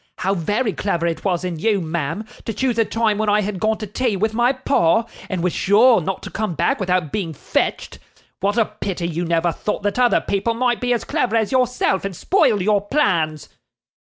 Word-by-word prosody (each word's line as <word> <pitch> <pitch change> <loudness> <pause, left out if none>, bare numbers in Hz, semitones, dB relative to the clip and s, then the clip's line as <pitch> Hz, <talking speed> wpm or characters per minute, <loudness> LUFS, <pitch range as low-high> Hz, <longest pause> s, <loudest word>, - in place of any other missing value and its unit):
How 190 +1 0
very 205 +5 -1
clever 170 -4 -1
it 170 -1 -2
was 185 -2 0
in 170 -3 -4
you, 210 +2 +2
ma'am, 165 +4 -3 0.2
to 225 - -3
choose 250 -3 0
a 225 - +4
time 220 -1 0
when 215 -1 +1
I 210 +1 +3
had 200 -2 -3
gone 220 +2 +1
to 215 - -5
tea 215 +2 -1
with 220 +3 0
my 240 +3 +3
pa, 230 -6 +2 0.2
and 185 -4 -2
was 180 - 0
sure 220 +2 +4
not 190 +4 -4
to - - -7
come 215 -5 -3
back 275 - +1
without 180 -6 0
being 170 -7 -3
fetched! - - -2 0.4
What 205 +3 0
a 230 - +4
pity 195 -5 -4
you 170 +1 -3
never 170 0 +1
thought 210 +4 -4
that 205 +3 -1
other 245 -1 +4
people 200 +4 -1
might 245 0 0
be 245 0 0
as 240 - +1
clever 255 -7 -1
as 220 -2 +1
yourself 250 -6 +1
and 195 -2 -4
spoil 260 - +2
your 205 0 +2
plans! 170 - 0
205 Hz, 215 wpm, -20 LUFS, 180-230 Hz, 0.4 s, a